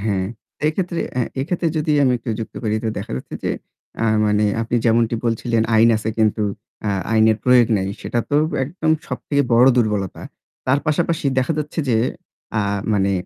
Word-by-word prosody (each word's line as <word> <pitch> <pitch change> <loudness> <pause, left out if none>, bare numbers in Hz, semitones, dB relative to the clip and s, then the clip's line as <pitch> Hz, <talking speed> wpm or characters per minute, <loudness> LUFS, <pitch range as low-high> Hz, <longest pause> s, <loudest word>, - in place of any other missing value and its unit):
হ্যাঁ, 100 -3 0 0.4
এক্ষেত্রে 170 +2 -1 0.2
এ - - +3 0.2
এক্ষেত্রে 170 +4 -1
যদি 150 0 +1
আমি 130 -2 +4
একটু 115 0 -5
যুক্ত 110 - -6
করি 110 0 0
তো - - +1
দেখা 100 - -6
যাচ্ছে - - -7
আ - - -30
যে - - +1 0.8
মানে 105 0 +2 0.2
আপনি 115 +1 -1
যেমনটি 115 0 +3
বলছিলেন 115 0 +1
আইন 115 +1 +6
আছে 110 0 -3
কিন্তু 110 0 +2 0.4
আ - - +1 0.2
আইনের 110 0 +4
প্রয়োগ 125 -2 +6
নাই। 95 0 -1
সেটা 120 - -2
তো 145 - +3 0.3
একদম 160 +2 -2 0.2
সবথেকে 140 +2 -1
বড় 120 +2 +6
দুর্বলতা। 105 -5 0 0.4
তার 130 +2 +3
পাশাপাশি 155 0 0
দেখা 130 +5 +1
যাচ্ছে 150 +2 -4
যে 115 - +3 0.6
আ - - +3 0.3
মানে 100 -1 +2
115 Hz, 170 wpm, -20 LUFS, 110-145 Hz, 0.8 s, আইন